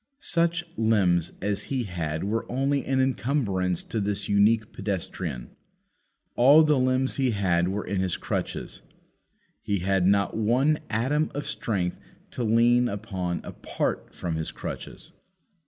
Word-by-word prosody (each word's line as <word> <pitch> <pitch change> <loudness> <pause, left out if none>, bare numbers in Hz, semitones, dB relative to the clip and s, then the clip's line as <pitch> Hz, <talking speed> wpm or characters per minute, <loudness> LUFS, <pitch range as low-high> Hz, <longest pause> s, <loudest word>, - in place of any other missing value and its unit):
Such 170 - +1
limbs 95 -7 +2
as 100 0 -1
he 130 -3 -1
had 80 -6 -3
were 110 +3 -2
only 135 +2 0
an 135 0 +1
encumbrance 115 - 0
to 115 - -3
this 105 0 -2
unique 105 +2 +3
pedestrian. 90 - -4 0.8
All 140 +6 +7
the 150 -3 +3
limbs 130 +1 +1
he 135 -2 +2
had 90 -5 +1
were 100 +2 -2
in 100 -2 -1
his 95 -2 -1
crutches. - - -4 0.8
He 100 -3 -1
had 95 -1 +2
not 100 0 +2
one 125 +8 +2
atom 135 +8 +1
of 145 - -3
strength 90 -6 -2 0.3
to 125 - -3
lean 120 +2 +4
upon 95 -4 -3
apart - - -4
from 85 -2 -3
his 80 - -3
crutches. - - -8
105 Hz, 140 wpm, -26 LUFS, 95-130 Hz, 0.8 s, All